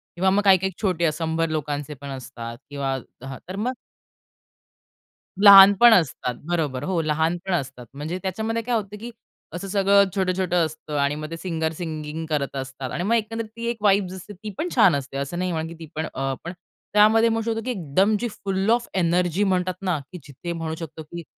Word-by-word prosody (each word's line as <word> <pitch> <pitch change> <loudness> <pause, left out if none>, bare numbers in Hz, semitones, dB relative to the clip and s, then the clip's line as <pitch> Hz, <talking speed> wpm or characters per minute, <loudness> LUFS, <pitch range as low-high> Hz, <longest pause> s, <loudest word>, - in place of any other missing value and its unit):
किंवा 190 +2 +2
मग 200 +2 +3
काही-काही 190 -1 +4
छोटे 170 -5 +1
100 165 0 -1
लोकांचे 150 -1 -3
पण 140 - -7
असतात 115 -2 -7
किंवा 135 -2 -2 0.3
हा 135 - -6
तर 190 - -5
मग 240 +6 -1 1.7
लहान 200 0 +11
पण 240 -1 +8
असतात, 130 - +1
बरोबर, 145 -6 -1
हो. 180 -1 0
लहानपण 160 +4 -1
असतात. 135 -6 -3
म्हणजे 155 +6 -4
त्याच्यामध्ये 220 +5 -2
काय 240 0 0
होतं 210 -1 -3
कि 240 +2 -7 0.4
असं 180 +3 -5
सगळं 200 0 +4
छोटं-छोटं 185 -2 +1
असतं 155 -1 -6
आणि 140 +1 +1
मग 155 +1 -6
ते 165 - -5
सिंगर 160 -3 -2
सिंगिंग 160 -1 -5
करत 140 -2 -1
असतात. 130 -1 -5
आणि 175 - -2
मग 220 +5 +1
एकंदरीत 225 0 -2
ती 230 0 -6
एक 235 - -2
वाइब 200 -2 +4
असते 195 +3 -10
ती 210 +3 -8
पण 345 - -1
छान 195 - +6
असते. 135 0 -4
असं 140 +5 -3
नाही 185 -1 -1
म्हणत 160 -1 -2
की 170 - -9
ती 165 - -8
पण 160 +1 -2
अ, 135 0 -2
पण 170 - -5 0.4
त्यामध्ये 220 +2 +5
होतो 225 0 -1
की 255 - -1
एकदम 190 - +1
जी, 240 - -1
"फुल 195 -1 -2
ऑफ 235 0 +2
एनर्जी" 180 +1 +1
म्हणतात 185 -1 +1
ना 180 -6 0
की 180 - -7
जिथे 145 +5 -7
म्हणू 160 -1 -4
शकतो 160 -1 -7
की 170 +2 -8
175 Hz, 195 wpm, -23 LUFS, 155-200 Hz, 1.7 s, लहान